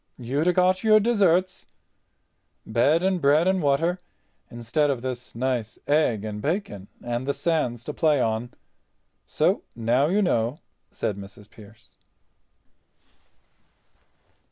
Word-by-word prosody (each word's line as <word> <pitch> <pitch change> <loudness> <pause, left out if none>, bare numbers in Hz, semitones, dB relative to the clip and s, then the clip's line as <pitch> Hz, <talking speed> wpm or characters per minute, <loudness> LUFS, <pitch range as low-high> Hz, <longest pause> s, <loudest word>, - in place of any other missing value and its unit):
"You'd 135 +7 -2
a - - +5
got 185 +2 +2
your 215 -1 +6
desserts—bed 180 - -1
and 190 -2 +1
bread 150 +5 +4
and 190 -1 +2
water, 165 +5 +1 0.5
instead 120 +6 -1
of 130 -3 -2
this 125 -2 -6
nice 120 -3 -2
egg 145 -8 +1
and 105 -1 -5
bacon 140 - -3 0.2
and 120 +2 -3
the 140 - 0
sands 125 -9 -1
to 150 - -6
play 150 -3 +2
on. 115 +1 -1 0.8
So - - +1
now 120 +5 +1
you 200 +5 +1
know," 120 -5 0 0.3
said 100 - -3
Mrs. 100 +1 -12
Pearce. 110 +1 -18
140 Hz, 120 wpm, -24 LUFS, 115-170 Hz, 0.8 s, your